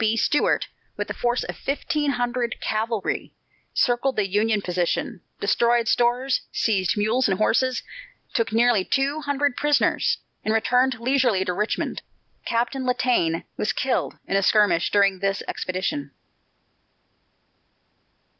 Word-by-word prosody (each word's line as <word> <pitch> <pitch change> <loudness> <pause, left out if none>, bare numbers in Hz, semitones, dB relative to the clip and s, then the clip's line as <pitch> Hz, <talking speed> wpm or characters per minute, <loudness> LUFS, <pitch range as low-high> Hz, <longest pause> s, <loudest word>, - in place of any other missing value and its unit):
B. 220 +1 +2
Stuart, 295 - +2 0.3
with - - -3
a - - -1
force 245 0 0
of - - -6
fifteen 295 +1 -2
hundred 245 -1 -1
cavalry, 220 -1 -2 0.4
circled 250 +2 +1
the 205 -2 +1
Union 210 +2 +1
position, 180 -1 -2 0.2
destroyed 235 -1 +2
stores, 245 +3 +2
seized 205 -2 0
mules 220 +4 +2
and 190 - +1
horses, 255 +4 +1 0.5
took 230 -2 0
nearly 230 -3 +3
two 275 +8 0
hundred 285 -2 0
prisoners, 295 -1 +2 0.3
and 215 - +1
returned 250 +2 +2
leisurely 245 -6 +2
to 180 - -1
Richmond. 210 +4 -2 0.4
Captain 240 +3 -1
Latané 250 -10 +1
was 210 - 0
killed 260 -1 -1
in - - -2
a 195 - +3
skirmish 195 -4 +3
during 200 -2 +3
this 195 0 -1
expedition. 185 -6 -3
230 Hz, 125 wpm, -24 LUFS, 205-255 Hz, 0.5 s, nearly